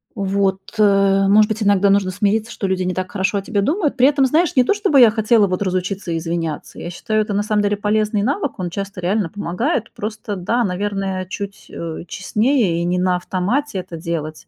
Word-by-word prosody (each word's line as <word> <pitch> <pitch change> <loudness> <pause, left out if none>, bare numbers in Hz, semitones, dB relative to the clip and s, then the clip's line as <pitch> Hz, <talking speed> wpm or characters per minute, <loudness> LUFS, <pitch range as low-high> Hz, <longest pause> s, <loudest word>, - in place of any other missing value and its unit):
Вот. 195 -1 0 0.2
Э, 195 -2 +4
может 210 +2 +5
быть, 220 0 -2
иногда 200 -1 +3
нужно 195 -1 +2
смириться, 210 +3 0
что 195 - -3
люди 185 -1 0
не 180 0 -1
так 185 0 -4
хорошо 200 0 0
о - - -6
тебе 200 +1 -1
думают. 295 - 0
При 255 +2 +6
этом, 280 -2 +3
знаешь, 320 +5 +1
не 255 - +5
то, 405 - +2
чтобы 395 -10 +2
я 235 -3 +8
хотела 220 -1 +3
вот 185 +1 -2
разучиться 185 -1 -2
извиняться. 165 -2 -4
Я 170 - -6
считаю, 215 +4 -1
это 210 -1 -3
на 205 - +1
самом 210 -1 0
деле 205 0 0
полезный 210 0 0
навык, 280 - -2
он 180 -1 -2
часто 195 +1 -6
реально 185 0 0
помогает. 220 - -2
Просто, 210 -1 -5
да 230 +7 0
наверное, 195 -1 -2
чуть, 200 +2 -7
э, 165 -1 -6
честнее 210 -3 0
и - - -1
не 180 +1 0
на 180 0 +2
автомате 195 +7 -2
это 180 -2 -7
делать. 160 -2 -5
200 Hz, 205 wpm, -19 LUFS, 185-220 Hz, 0.2 s, я